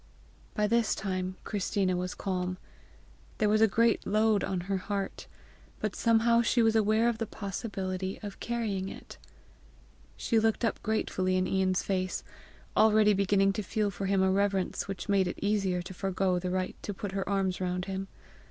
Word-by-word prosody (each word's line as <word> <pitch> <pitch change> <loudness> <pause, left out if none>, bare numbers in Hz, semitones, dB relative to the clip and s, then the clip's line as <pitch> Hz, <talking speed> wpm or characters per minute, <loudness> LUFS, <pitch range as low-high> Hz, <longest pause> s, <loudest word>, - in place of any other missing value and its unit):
By 210 - +2
this 230 +1 +2
time 185 -1 -3
Christina 195 -2 0
was 180 0 -3
calm. 185 -2 -2 0.8
There 215 - +2
was 215 +1 +3
a 220 - +7
great 230 +2 +2
load 215 0 +3
on 190 -2 -1
her 195 +2 -1
heart, 195 0 -4 0.5
but 215 -2 -2
somehow 230 0 +4
she 235 0 +2
was 225 0 +3
aware 220 +1 +3
of 235 -2 0
the 225 - -2
possibility 195 -2 -4
of 205 -1 -7
carrying 210 -5 -2
it. - - -11 1.0
She 230 - +2
looked 225 +1 +1
up 225 - -1
gratefully 185 -4 0
in 185 - +1
Ian's 185 -1 +1
face, 185 -1 -1 0.5
already 215 -1 +5
beginning 195 0 +3
to 215 - -2
feel 210 0 -1
for 195 +1 -4
him 195 -1 +2
a 190 - +3
reverence 195 -1 0
which 195 -3 -5
made 195 -2 +3
it - - -4
easier 195 -4 0
to 180 - -8
forego 190 -1 0
the 180 +1 -3
right 185 0 -2
to 205 - -5
put 200 0 -5
her 195 0 -3
arms 190 -2 0
round 180 0 -1
him. 195 0 -4
195 Hz, 175 wpm, -29 LUFS, 185-215 Hz, 1.0 s, a